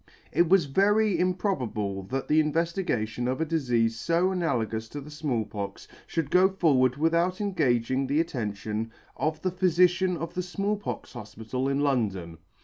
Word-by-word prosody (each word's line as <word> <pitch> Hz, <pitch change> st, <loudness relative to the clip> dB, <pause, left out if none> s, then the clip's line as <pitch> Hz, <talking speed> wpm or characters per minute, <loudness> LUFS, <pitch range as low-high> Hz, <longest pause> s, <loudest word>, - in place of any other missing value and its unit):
It 170 Hz, -1 st, +3 dB
was 190 Hz, -4 st, +5 dB
very 205 Hz, +7 st, +2 dB
improbable 130 Hz, -, -1 dB
that 135 Hz, +4 st, -3 dB
the 155 Hz, -, +4 dB
invefligation 150 Hz, -, -1 dB
of 130 Hz, +2 st, -1 dB
a 160 Hz, -, +1 dB
difeafe 120 Hz, -8 st, 0 dB
fo 170 Hz, +5 st, +2 dB
analagous 115 Hz, -, -1 dB
to 145 Hz, -, -6 dB
the 145 Hz, +2 st, -10 dB
Small 145 Hz, -7 st, -2 dB
Pox, 100 Hz, -2 st, -6 dB, 0.2 s
fhould 160 Hz, -4 st, -2 dB
go 185 Hz, +1 st, +5 dB
forward 140 Hz, -9 st, +2 dB
without 170 Hz, +4 st, +1 dB
engaging 130 Hz, -, +1 dB
the 145 Hz, +3 st, +1 dB
attention 110 Hz, -6 st, -3 dB, 0.2 s
of 155 Hz, 0 st, -2 dB
the 185 Hz, -, +1 dB
Phyfici'an 180 Hz, 0 st, +2 dB
of 165 Hz, +1 st, -5 dB
the 180 Hz, -, -1 dB
Small 195 Hz, +3 st, -1 dB
pox 205 Hz, -, -6 dB
Hofpital 115 Hz, +3 st, -4 dB
in 140 Hz, +1 st, 0 dB
London. 100 Hz, -, -1 dB
145 Hz, 155 wpm, -27 LUFS, 115-180 Hz, 0.2 s, was